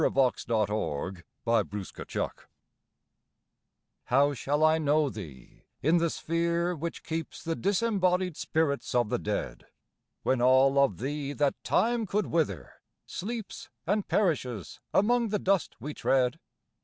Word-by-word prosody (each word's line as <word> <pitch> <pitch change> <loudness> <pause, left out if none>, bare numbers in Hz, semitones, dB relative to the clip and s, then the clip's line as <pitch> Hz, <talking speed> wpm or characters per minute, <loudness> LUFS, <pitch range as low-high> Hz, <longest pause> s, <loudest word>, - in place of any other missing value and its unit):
By - - +5
William 120 -4 +2
Cullen 95 -4 -2 0.9
Bryant - - -2 1.7
How 140 +3 +3
shall 145 +4 0
I 155 0 +5
know 150 -1 +2
thee 75 - -11 0.2
in 165 +4 +4
the 170 0 +2
sphere 170 +2 0
which 165 +2 -5
keeps 160 -1 -5
The 165 0 -1
disembodied 185 -3 +1
spirits 145 -5 -1
of 120 -3 +3
the - - 0
dead, - - -3 0.6
When 130 -2 +1
all 130 +2 +5
of 105 -10 0
thee 140 +3 -3
that 145 -1 0
time 225 - +1
could 205 +1 0
wither 120 - -2 0.2
sleeps 225 +2 -6 0.2
And 205 +3 0
perishes 130 - 0
among 235 +4 +3
the 210 - +1
dust 195 -1 +1
we 145 +6 -5
tread? 130 +2 +1
155 Hz, 130 wpm, -29 LUFS, 130-180 Hz, 1.7 s, By